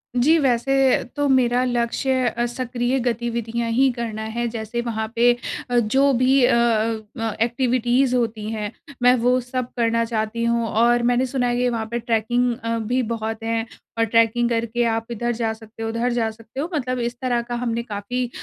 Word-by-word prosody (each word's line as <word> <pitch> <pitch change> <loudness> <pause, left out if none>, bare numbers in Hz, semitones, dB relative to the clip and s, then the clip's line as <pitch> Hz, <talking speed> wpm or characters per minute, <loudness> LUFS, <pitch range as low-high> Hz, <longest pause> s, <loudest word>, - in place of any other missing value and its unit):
जी, 295 +7 +4
वैसे 270 0 +2
तो 290 -1 +1
मेरा 250 -1 +3
लक्ष्य 250 +1 0
अ, 235 0 -1
सक्रिय 245 +1 -1
गतिविधियाँ 235 -1 -2
ही 265 +4 +4
करना 230 -3 -4
है, 235 +2 -2
जैसे 225 +1 -4
वहाँ 220 -2 -3
पे 240 +1 +5 0.4
अ, 245 - +1
जो 265 +5 +3
भी 255 +1 +3
अ - - +3
अ 230 -1 +1 0.2
अ, 225 -1 -1
एक्टिविटीज़ 245 +1 +2
होती 225 -3 -1
हैं। 210 -2 -3 0.3
मैं 250 0 +7
वो 250 +1 +2
सब 250 0 -3
करना 230 0 +2
चाहती 225 0 -2
हूँ 235 0 +1
और 235 +2 +3
मैंने 245 +1 +2
सुना 255 -1 -1
है 240 0 0
कि 250 0 +2
वहाँ 230 -2 -2
पे 235 - -1
ट्रैकिंग 240 +2 +1
अ, 230 0 -1
भी 245 +4 0
बहुत 225 0 -3
हैं 225 0 -1 0.3
और 230 - +3
ट्रैकिंग 230 +1 +2
करके 235 0 0
आप 225 0 0
इधर 240 +1 -1
जा 225 -1 -1
सकते 220 0 -10
हो, 225 - -2
उधर 230 +2 0
जा 230 -2 0
सकते 225 +3 -11
हो। 315 +5 -2
मतलब 255 -4 -1
इस 240 0 -2
तरह 245 -2 +1
का 240 +1 -5
हमने 235 -1 -2
काफ़ी 235 +3 -3
235 Hz, 190 wpm, -22 LUFS, 225-245 Hz, 0.4 s, मैं